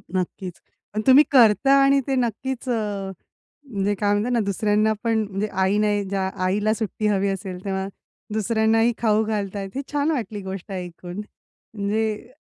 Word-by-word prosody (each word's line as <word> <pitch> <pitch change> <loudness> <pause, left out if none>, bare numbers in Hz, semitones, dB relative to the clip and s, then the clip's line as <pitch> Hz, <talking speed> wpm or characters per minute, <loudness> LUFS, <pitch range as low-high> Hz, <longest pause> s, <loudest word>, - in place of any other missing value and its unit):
नक्कीच. 185 0 -3 0.3
पण 215 - -1
तुम्ही 265 +3 +9
करता 245 0 +6
आणि 275 0 +5
ते 270 - +1
नक्कीच 250 +1 -2
अ, 205 -4 -2 0.6
म्हणजे 200 -1 0
काय 205 +1 0
म्हणतात 210 +4 0
ना 240 - +2
दुसऱ्यांना 210 +2 +2
पण 225 -1 +2
म्हणजे 200 +2 -2
आई 190 +2 +1
नाही 210 -1 +2
ज्या, 195 -1 0 0.2
आईला 205 +3 +1
सुट्टी 215 -1 -2
हवी 200 -1 +2
असेल, 190 -2 -5
तेव्हा 190 -1 -2 0.5
दुसऱ्यांनाही 225 +2 +2
खाऊ 215 -1 +2
घालतायेत. 200 -2 -3
ही 275 - -1
छान 290 +2 +1
वाटली 220 -8 -3
गोष्ट 190 0 -7
ऐकून. 180 +1 -6 0.5
म्हणजे 215 +3 -2
210 Hz, 155 wpm, -23 LUFS, 195-225 Hz, 0.6 s, तुम्ही